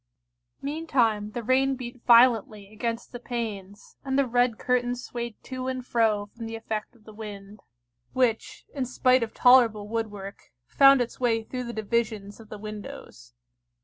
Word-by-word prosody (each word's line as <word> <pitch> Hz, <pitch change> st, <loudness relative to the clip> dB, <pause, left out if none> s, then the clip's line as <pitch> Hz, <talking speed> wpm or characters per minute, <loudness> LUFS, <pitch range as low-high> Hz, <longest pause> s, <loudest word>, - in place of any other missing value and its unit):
Meantime 260 Hz, -9 st, 0 dB
the 240 Hz, -, -4 dB
rain 265 Hz, +3 st, +2 dB
beat 245 Hz, -1 st, -8 dB
violently 225 Hz, -4 st, +4 dB
against 230 Hz, +2 st, -4 dB
the 245 Hz, -, -7 dB
panes, 210 Hz, -5 st, -6 dB
and 265 Hz, -1 st, -1 dB
the 280 Hz, -, +3 dB
red 245 Hz, -1 st, +1 dB
curtains 245 Hz, 0 st, -1 dB
swayed 235 Hz, -2 st, -5 dB
to 255 Hz, 0 st, -5 dB
and 255 Hz, -1 st, -3 dB
fro 220 Hz, -4 st, +1 dB
from 225 Hz, +2 st, -9 dB
the 225 Hz, -, -6 dB
effect 220 Hz, +1 st, -5 dB
of 225 Hz, -, -23 dB
the 215 Hz, -, -13 dB
wind, 205 Hz, -1 st, -9 dB, 0.5 s
which, 245 Hz, -4 st, -1 dB
in 275 Hz, -, -2 dB
spite 255 Hz, 0 st, +2 dB
of 225 Hz, -1 st, -2 dB
tolerable 235 Hz, -5 st, +5 dB
woodwork, 210 Hz, -3 st, -5 dB
found 275 Hz, -, +6 dB
its 240 Hz, -, -4 dB
way 230 Hz, -3 st, +1 dB
through 250 Hz, +2 st, -5 dB
the 235 Hz, -, -5 dB
divisions 220 Hz, -2 st, -2 dB
of 220 Hz, -1 st, -14 dB
the 215 Hz, -, -7 dB
windows. 205 Hz, -, -10 dB
230 Hz, 160 wpm, -26 LUFS, 215-250 Hz, 0.5 s, found